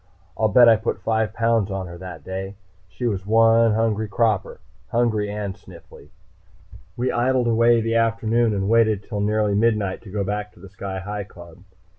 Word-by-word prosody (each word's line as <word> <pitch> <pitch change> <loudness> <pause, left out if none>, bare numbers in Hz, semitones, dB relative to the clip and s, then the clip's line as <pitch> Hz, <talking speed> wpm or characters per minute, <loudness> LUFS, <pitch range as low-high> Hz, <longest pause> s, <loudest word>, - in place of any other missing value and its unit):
I'll 110 - +1
bet 120 +4 +6
I 115 -1 +6
put 105 -3 -4
five 110 0 0
pounds 115 -2 +1
on 95 -1 -4
her 85 -1 -10
that 90 -3 -9
day. 95 +1 -6 0.3
She 125 - -6
was 100 -5 -1
one 115 +1 +4
hungry 110 -1 0
'cropper. 110 -1 -1 0.3
Hungry 110 -3 0
and 105 -1 -4
sniffly. 85 -5 -16 0.9
We 125 +2 0
idled 125 +1 +1
away 115 0 +3
the 115 +1 -1
afternoon 115 0 +1
and 95 0 -1
waited 110 -2 +2
until 105 -1 -5
nearly 105 0 +1
midnight 105 -3 0
to 110 - -13
go 100 +1 -2
back 105 +1 -4
to - - -20
the 100 +2 -13
Sky 95 0 -6
Hi 105 +1 -5
Club. 85 -3 -14
105 Hz, 180 wpm, -22 LUFS, 100-115 Hz, 0.9 s, bet